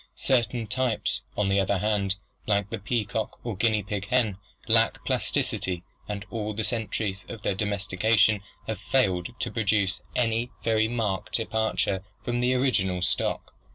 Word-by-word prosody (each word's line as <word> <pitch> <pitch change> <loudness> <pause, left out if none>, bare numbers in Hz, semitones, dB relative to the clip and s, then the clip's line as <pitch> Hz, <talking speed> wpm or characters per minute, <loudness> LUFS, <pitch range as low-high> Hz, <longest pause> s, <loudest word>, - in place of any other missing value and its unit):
Certain 120 -2 +1
types, 110 - 0 0.2
on 105 - +2
the 100 0 +3
other 100 +1 +2
hand, 100 -1 +1 0.3
like 100 -1 +1
the 115 - -2
peacock 110 0 -2
or 115 -4 -2
guinea 105 0 +2 0.2
hen, 115 -6 +2 0.3
lack 115 0 +3
plasticity 125 -9 0 0.3
and 100 -1 -3
all 110 -2 -2
the 110 - -1
centuries 110 -4 -2
of 110 -3 -7
their - - +1
domestication 100 +1 +2 0.2
have 110 - -3
failed 95 -10 +1
to - - -2
produce 100 -4 +1
any 115 0 +1
very 110 -1 +3
marked 110 -5 -2
departure 110 -4 +1 0.2
from 120 0 -1
the 125 +1 +2
original 95 -9 +1
stock. - - 0
110 Hz, 145 wpm, -27 LUFS, 100-115 Hz, 0.3 s, the